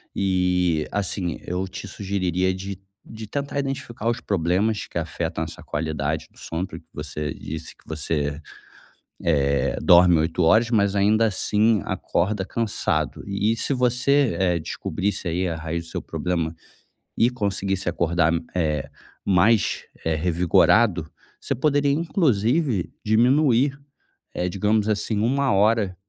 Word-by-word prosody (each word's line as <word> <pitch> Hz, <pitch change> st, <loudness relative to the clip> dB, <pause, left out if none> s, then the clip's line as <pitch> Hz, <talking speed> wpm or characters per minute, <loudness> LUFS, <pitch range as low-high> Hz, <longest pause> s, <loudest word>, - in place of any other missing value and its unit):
E, 90 Hz, -4 st, +1 dB
assim, 95 Hz, -3 st, -2 dB
eu 90 Hz, +2 st, -2 dB
te 95 Hz, +1 st, -8 dB
sugeriria 95 Hz, -2 st, -1 dB
de 95 Hz, 0 st, -6 dB, 0.2 s
de 110 Hz, -1 st, -9 dB
tentar 140 Hz, +5 st, -3 dB
identificar 135 Hz, -5 st, -4 dB
os 120 Hz, 0 st, -2 dB
problemas 95 Hz, +3 st, 0 dB
que -, -, -6 dB
afetam 80 Hz, -, -3 dB
essa 80 Hz, -, -8 dB
qualidade 80 Hz, 0 st, -2 dB
do -, -, -20 dB
sono, 85 Hz, +3 st, -3 dB
porque -, -, -11 dB
você 75 Hz, 0 st, -4 dB
disse 80 Hz, +1 st, -7 dB
que -, -, -26 dB
você, 75 Hz, -1 st, -2 dB, 1.1 s
eh, 70 Hz, -, 0 dB
dorme 90 Hz, -1 st, +6 dB
8 80 Hz, +2 st, 0 dB
horas, 110 Hz, +7 st, +4 dB
mas 100 Hz, -4 st, +2 dB
ainda 105 Hz, +3 st, +3 dB
assim, 105 Hz, 0 st, +2 dB
acorda 95 Hz, +2 st, -1 dB
cansado. 115 Hz, 0 st, -1 dB
E 100 Hz, +3 st, 0 dB
se 140 Hz, -, 0 dB
você, 125 Hz, -1 st, +2 dB
eh, 90 Hz, -2 st, +2 dB
descobrisse 95 Hz, +4 st, -3 dB
aí 90 Hz, +2 st, 0 dB
a 85 Hz, -, -2 dB
raiz 80 Hz, +1 st, -4 dB
do -, -, -11 dB
seu -, -, -3 dB
problema 85 Hz, -2 st, -2 dB, 0.6 s
e 120 Hz, +2 st, +4 dB
conseguir 100 Hz, -4 st, -1 dB
se 95 Hz, -, -3 dB
acordar, 85 Hz, -1 st, +1 dB, 0.2 s
eh, 75 Hz, -5 st, -1 dB, 0.3 s
mais, 100 Hz, +2 st, +3 dB, 0.2 s
eh, 80 Hz, -, +1 dB
revigorado, 90 Hz, +2 st, +3 dB, 0.3 s
você -, -, -2 dB
poderia 145 Hz, +1 st, +2 dB
inclusive 140 Hz, -, +1 dB
diminuir, 130 Hz, +4 st, +3 dB, 0.5 s
eh, 90 Hz, -, -1 dB
digamos 105 Hz, +3 st, +1 dB
assim, 105 Hz, 0 st, 0 dB
1 135 Hz, +4 st, +1 dB
hora, 105 Hz, -1 st, +2 dB
95 Hz, 135 wpm, -23 LUFS, 85-115 Hz, 1.1 s, dorme